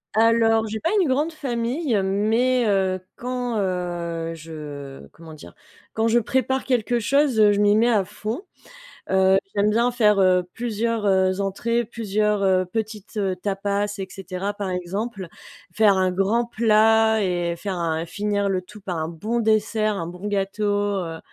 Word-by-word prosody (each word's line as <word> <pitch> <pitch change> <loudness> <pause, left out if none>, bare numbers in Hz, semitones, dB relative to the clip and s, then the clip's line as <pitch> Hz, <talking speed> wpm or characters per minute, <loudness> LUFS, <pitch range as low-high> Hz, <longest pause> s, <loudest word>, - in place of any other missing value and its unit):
Alors, 225 0 +4
j'ai 220 +1 -4
pas 330 - -1
une 360 - +2
grande 295 +5 +1
famille, 255 -1 -2
mais, 225 +6 +1
heu, 190 -2 +1 0.2
quand, 245 -2 -3
heu, 175 -3 -3
je 150 -4 -9
comment 160 -1 -13
dire? 85 - -13 0.4
Quand 220 +1 +1
je 230 +1 +3
prépare 260 +3 0
quelque 240 -2 +1
chose, 275 +1 +2
heu, 210 -1 +6
je 205 - +1
m'y 205 0 +4
mets 235 +3 +3
à 210 -4 +3
fond. 215 - -5 0.7
Heu, 190 0 +4 0.2
j'aime 205 +1 +2
bien 235 +3 +2
faire, 210 -4 +3
heu, 180 -1 +3
plusieurs, 230 -1 -2
heu, 190 -1 +2
entrées, 230 +5 -1
plusieurs, 210 -2 -1
heu, 185 -1 +3
petites, 215 +2 -5
heu, 190 -2 0
tapas, 200 +1 -2
et 190 - -4
cetera, 195 +1 -5
par 200 -2 -4
exemple. 190 +2 -4 0.4
Faire 210 -3 +3
un 185 0 +2
grand 210 +6 +1
plat 220 -1 +3
et 175 -2 -1
faire 195 -1 -4
un 165 -1 -2
finir 205 +2 -1
le 185 -1 -1
tout 210 +3 -14
par 185 -3 -4
un 160 0 -2
bon 210 +9 -3
dessert, 215 -1 +1
un 165 - -3
bon 180 +4 -8
gâteau, 200 +1 -2 0.4
heu. 165 -1 -6
205 Hz, 165 wpm, -23 LUFS, 185-230 Hz, 0.7 s, heu